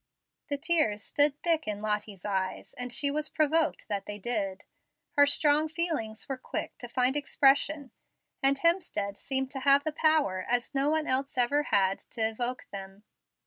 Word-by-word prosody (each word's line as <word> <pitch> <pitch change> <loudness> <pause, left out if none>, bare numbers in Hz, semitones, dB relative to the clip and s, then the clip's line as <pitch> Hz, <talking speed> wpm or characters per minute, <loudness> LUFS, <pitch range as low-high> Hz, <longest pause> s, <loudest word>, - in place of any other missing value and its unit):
The 285 - -1
tears 295 - +1
stood 290 0 +2
thick 325 -5 +1
in 210 -1 -2
Lottie's 210 -2 -3
eyes, 190 -2 -3
and 250 0 -6
she 280 +4 +2
was 305 +1 -2
provoked 310 +1 0
that 200 -1 -3
they 205 - -5
did. 200 -3 -2 0.5
Her 285 -2 +5
strong 300 +1 +3
feelings 310 -10 -2
were 270 - -4
quick 255 - -5
to 245 - -8
find 255 +2 +1
expression, 285 0 +2 0.5
and 275 0 +4
Hemstead 275 - 0
seemed 265 +3 -2
to 270 - -5
have 275 +1 +5
the 310 - -2
power, 300 - +2
as 245 +2 -1
no 275 +1 +1
one 315 0 +1
else 265 0 -1
ever 255 +4 +3
had, 195 -1 +2
to 230 - -6
evoke 240 +3 -4
them. 195 +1 -9
265 Hz, 170 wpm, -28 LUFS, 210-295 Hz, 0.5 s, Her